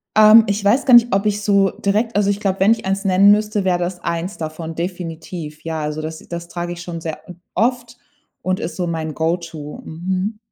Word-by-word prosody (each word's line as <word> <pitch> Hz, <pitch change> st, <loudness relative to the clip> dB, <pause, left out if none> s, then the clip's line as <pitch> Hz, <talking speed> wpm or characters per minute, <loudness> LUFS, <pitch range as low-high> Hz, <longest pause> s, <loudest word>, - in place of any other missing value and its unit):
Ähm, 215 Hz, +1 st, +8 dB
ich 200 Hz, 0 st, -1 dB
weiß 235 Hz, +8 st, +3 dB
gar 255 Hz, -, +4 dB
nicht, 240 Hz, -1 st, +7 dB
ob 200 Hz, +2 st, 0 dB
ich 210 Hz, 0 st, 0 dB
so 200 Hz, -2 st, +3 dB
direkt 215 Hz, +3 st, -1 dB
also, 205 Hz, -1 st, +2 dB
ich 200 Hz, 0 st, 0 dB
glaube, 195 Hz, -3 st, -1 dB
wenn 200 Hz, +3 st, +5 dB
ich 225 Hz, -4 st, 0 dB
eins 195 Hz, +1 st, -1 dB
nennen 195 Hz, +2 st, +6 dB
müsste, 210 Hz, -1 st, +1 dB
wäre 180 Hz, -1 st, +2 dB
das 175 Hz, 0 st, -3 dB
eins 170 Hz, +4 st, -3 dB
davon, 160 Hz, 0 st, -6 dB
definitiv. 165 Hz, -3 st, -6 dB
Ja, 160 Hz, -1 st, -3 dB
also 150 Hz, +1 st, -3 dB
das 160 Hz, 0 st, -6 dB
das 170 Hz, 0 st, -6 dB
trage 175 Hz, 0 st, -4 dB
ich 175 Hz, -, -9 dB
schon 170 Hz, -2 st, -6 dB
sehr 160 Hz, -2 st, -5 dB, 0.4 s
oft 240 Hz, 0 st, 0 dB, 0.4 s
und 185 Hz, 0 st, -1 dB
ist 160 Hz, 0 st, -5 dB
so 180 Hz, -, -2 dB
mein 160 Hz, -2 st, -3 dB
Go-to. 160 Hz, -2 st, -3 dB
Mhm. 185 Hz, +6 st, -3 dB
185 Hz, 210 wpm, -19 LUFS, 165-205 Hz, 0.4 s, Ähm